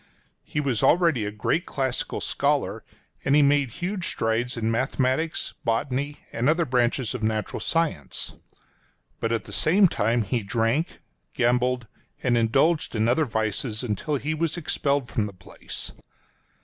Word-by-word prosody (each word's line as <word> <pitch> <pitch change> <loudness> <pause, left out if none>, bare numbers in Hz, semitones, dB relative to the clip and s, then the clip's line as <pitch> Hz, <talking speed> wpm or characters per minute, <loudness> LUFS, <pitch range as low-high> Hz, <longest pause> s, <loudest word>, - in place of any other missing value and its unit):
He 155 - -3
was 135 -7 0
already 165 - +4
a 105 - -2
great 110 - -1
classical 130 -2 -2
scholar, - - 0 0.4
and 135 - +3
he 150 - +6
made 140 -2 +3
huge 180 - -3
strides 115 +2 0
in 115 0 0
mathematics, 130 +6 0
botany, 135 +4 -1 0.2
and 120 +5 +1
other 165 +2 +3
branches 125 -1 +1
of 125 - -4
natural 110 0 -1
science. 165 -2 -1 0.9
But 115 - -1
at 115 - 0
the - - -10
same 190 +5 +5
time 115 -5 +1
he 115 +3 -1
drank, 115 +9 0 0.3
gambled, 125 0 +2 0.4
and 125 -2 +3
indulged 135 +7 +2
in 110 +1 +2
other 130 +6 +3
vices 110 0 -1
until 125 +6 -1
he 145 +3 -1
was 165 +1 -1
expelled 140 -4 0
from 105 -3 -1
the 100 - -9
place. 90 -1 -7
125 Hz, 150 wpm, -25 LUFS, 115-150 Hz, 0.9 s, he